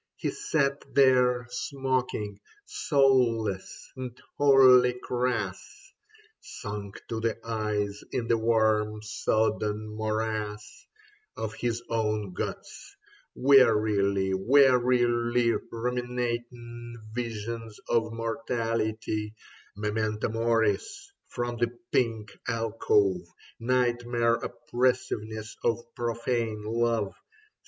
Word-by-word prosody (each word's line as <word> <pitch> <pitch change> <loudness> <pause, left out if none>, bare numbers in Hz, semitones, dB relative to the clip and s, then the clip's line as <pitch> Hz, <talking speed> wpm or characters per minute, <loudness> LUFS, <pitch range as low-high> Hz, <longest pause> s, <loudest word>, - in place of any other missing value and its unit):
He - - -2
sat 140 - 0
there 125 -2 +4
smoking, 130 -7 -2 0.3
soulless 120 -8 +1
and 125 -2 -7 0.2
wholly 130 -3 +6
crass, 125 0 -3 0.5
Sunk 105 -1 -7
to 115 - -2
the 115 0 -1
eyes 105 -2 -2
in 120 -2 -2
the 115 - +3
warm 110 -1 +2
sodden 110 -1 0
morass 110 -1 -3 0.5
Of 110 -1 -3
his 120 -1 -2
own 110 -4 -1
guts, - - -6 0.4
wearily, 105 -7 +4
wearily 120 0 +3 0.2
Ruminating 120 0 -4 0.2
visions 115 -1 -5
of 115 -1 +1
mortality 115 -2 -2 0.2
— - - -26
Memento 105 +1 -1
Moris 115 - 0 0.2
from 120 0 -3
the 120 0 -1
pink 110 -4 0 0.2
alcove. 105 -5 +1 0.4
Nightmare 120 -1 +1
oppressiveness 115 -4 -2
of 115 - +2 0.2
profane 115 -2 -2
love. 115 -2 0
115 Hz, 85 wpm, -28 LUFS, 110-125 Hz, 0.5 s, wholly